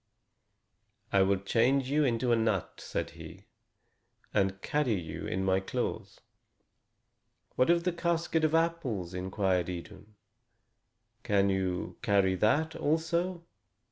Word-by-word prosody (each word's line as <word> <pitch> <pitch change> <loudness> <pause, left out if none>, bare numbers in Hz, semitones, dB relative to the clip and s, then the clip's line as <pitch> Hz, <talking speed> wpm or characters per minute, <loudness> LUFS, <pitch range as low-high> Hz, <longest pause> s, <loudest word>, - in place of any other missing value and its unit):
"I 100 - +5
will 95 +1 +3
change 125 +7 +1
you 150 +1 +3
into 120 -2 +1
a - - +5
nut," 110 -5 -1
said - - -3
he, - - -12 0.9
"and 95 -1 +1
carry 145 -7 +1
you 80 -2 -6
in 95 +1 -2
my 95 0 +3
claws." 95 - -4 1.4
"What 130 - +3
of 170 0 +4
the 180 0 0
casket 170 -1 0
of 155 0 +3
apples?" 145 - -1 0.2
queried 95 -3 +1
Idun. 95 +4 -9 1.1
"Can 100 -1 +2
you 90 -2 -2
carry 100 -3 +3
that 145 - +1
also?" 170 +3 -1
115 Hz, 120 wpm, -30 LUFS, 95-160 Hz, 1.4 s, I